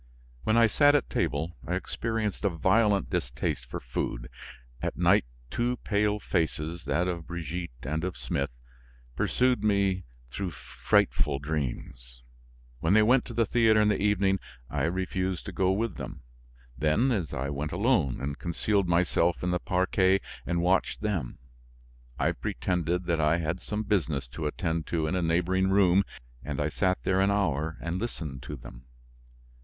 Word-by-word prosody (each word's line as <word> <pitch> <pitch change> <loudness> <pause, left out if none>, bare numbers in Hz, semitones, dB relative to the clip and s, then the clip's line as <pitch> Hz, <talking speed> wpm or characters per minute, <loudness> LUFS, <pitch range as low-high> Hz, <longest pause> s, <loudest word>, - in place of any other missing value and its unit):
When 110 - +3
I 115 - +7
sat 145 +6 +5
at 145 - 0
table, 80 +4 -1
I - - 0
experienced 110 -3 -2
a 100 - +3
violent 100 +4 +2
distaste 80 -10 -2
for - - -5
food; - - -4 0.5
at - - -2
night - - +4 0.3
two 120 +1 0
pale 105 0 +1
faces, 85 -3 -2
that 90 +2 +1
of 85 -3 -3
Brigitte 85 +1 -4
and 80 +2 -2
of 90 -1 -3
Smith, 70 0 -2 0.7
pursued 125 -2 +2
me 100 -3 +2 0.3
through 95 +5 -3
frightful 75 -2 +1
dreams. 60 -4 -5 0.6
When 80 +9 +2
they 110 - +6
went 125 +3 +4
to 120 - -8
the 115 0 +3
theater 110 0 +4
in 105 0 +4
the 105 - +1
evening, 100 -2 +2 0.3
I - - 0
refused 95 +1 -2
to - - -5
go 95 -1 +2
with 110 +4 -1
them; - - -7 0.5
then, 85 - +2
I 70 +3 -3
went 75 +2 -3
alone 90 - +2
and 70 +1 -4
concealed 95 +3 0
myself 85 0 +2
in 90 - 0
the 90 - +1
parquet 95 +1 +2 0.3
and 85 0 0
watched 95 +2 +1
them. 95 - -2 0.8
I - - +2
pretended 90 +6 -1
that 85 -2 +1
I 75 +2 +3
had 85 +2 -2
some 105 +4 -3
business 80 - 0
to 75 +5 -3
attend 80 0 -2
to 80 -2 0
in 80 - -1
a 90 - +1
neighboring 90 +3 +2
room 95 -1 +5 0.4
and 70 +1 -4
I 75 +1 +1
sat 95 +3 +1
there 95 0 +2
an 100 - +3
hour 80 -6 0
and 85 +2 -2
listened 75 - -5
to 70 +4 -6
them. - - -12
90 Hz, 160 wpm, -28 LUFS, 80-100 Hz, 0.8 s, I